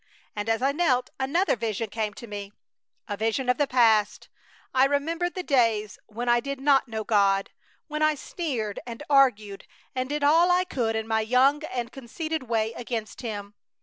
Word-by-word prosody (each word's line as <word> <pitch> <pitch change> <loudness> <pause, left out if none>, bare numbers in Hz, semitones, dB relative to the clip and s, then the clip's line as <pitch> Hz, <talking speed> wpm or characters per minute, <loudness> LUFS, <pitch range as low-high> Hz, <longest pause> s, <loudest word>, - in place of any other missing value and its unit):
And 210 +1 -3
as 225 +2 +1
I 275 - +3
knelt 275 -5 +1
another 310 +8 +1
vision 225 -1 -2
came 215 -2 -3
to - - -9
me, 205 -2 -7 0.5
a 205 - -3
vision 225 +5 -1
of 250 - +3
the 290 - +2
past! 225 -5 +2 0.4
I 260 +1 +5
remembered 325 +5 -1
the 365 - -3
days 230 - +1
when 235 +3 -5
I 240 0 +4
did 275 +2 -5
not 275 -1 +3
know 220 -1 -4
God; 200 -2 +2 0.4
when 305 0 -4
I 310 0 +3
sneered 255 - -4
and 235 +4 -7
argued 215 -8 +3 0.3
and 255 0 -2
did 295 0 -2
all 325 +5 +5
I 360 +1 +4
could 240 -11 -2
in 220 0 -2
my 220 0 +1
young 260 +6 +3
and 245 -4 -4
conceited 310 +5 -4
way 225 -1 0
against 230 -2 -5
Him. 205 -4 -6
245 Hz, 180 wpm, -26 LUFS, 220-285 Hz, 0.5 s, I